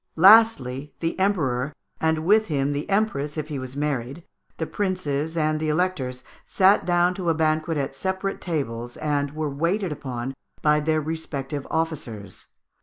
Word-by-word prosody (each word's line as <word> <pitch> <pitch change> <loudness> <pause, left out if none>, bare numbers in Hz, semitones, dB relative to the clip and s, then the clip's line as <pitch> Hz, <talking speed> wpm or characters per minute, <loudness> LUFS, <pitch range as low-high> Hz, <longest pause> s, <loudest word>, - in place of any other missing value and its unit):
Lastly, 160 - +5
the 165 +2 -2
Emperor, 150 -9 +1 0.3
and 160 0 +1
with 215 +4 +4
him 140 -2 0
the 145 +1 -3
Empress 165 -8 0
if 155 0 -3
he 145 -3 -3
was 130 +1 -7
married, 145 +1 -2 0.3
the 160 - -2
princes, 160 -5 -2
and 155 -1 +1
the 155 0 -1
Electors, 150 -7 -1 0.2
sat 195 +1 +3
down 175 0 +3
to 180 -2 -2
a 165 - +2
banquet 155 0 +1
at 135 -1 -2
separate 190 +5 -2
tables, 120 -8 -3
and 145 -1 -1
were 155 -1 -1
waited 170 +6 0
upon 130 -3 -4 0.3
by 150 0 +4
their 155 +1 +1
respective 145 -3 -4
officers. 140 - -4
155 Hz, 155 wpm, -24 LUFS, 140-175 Hz, 0.3 s, Lastly